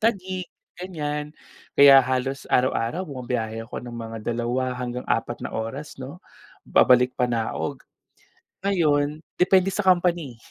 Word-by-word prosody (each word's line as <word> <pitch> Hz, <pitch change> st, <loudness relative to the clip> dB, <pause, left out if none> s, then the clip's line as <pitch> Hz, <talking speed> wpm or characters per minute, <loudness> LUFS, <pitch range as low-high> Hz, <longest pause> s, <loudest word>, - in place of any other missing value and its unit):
Taguig 190 Hz, -5 st, -1 dB, 0.3 s
ganiyan, 150 Hz, -4 st, -4 dB, 0.4 s
kaya 140 Hz, -1 st, +9 dB
halos 130 Hz, +1 st, -2 dB
araw-araw 125 Hz, +6 st, +1 dB
bumabiyahe 120 Hz, -6 st, -4 dB
ako -, -, -6 dB
ng 120 Hz, -, -8 dB
mga 115 Hz, -1 st, -6 dB, 0.2 s
2 125 Hz, +2 st, -1 dB
hanggang 125 Hz, 0 st, -5 dB
4 120 Hz, +1 st, -2 dB
na -, -, -5 dB
oras 130 Hz, +7 st, -5 dB
'no, 140 Hz, +8 st, -9 dB, 0.4 s
babalik 125 Hz, 0 st, +4 dB
panaog. 115 Hz, -, -1 dB, 0.9 s
Ngayon 150 Hz, -6 st, +2 dB, 0.2 s
depende 190 Hz, +1 st, +4 dB
sa 205 Hz, -, 0 dB
company. 175 Hz, -, +2 dB
135 Hz, 120 wpm, -24 LUFS, 120-170 Hz, 0.9 s, kaya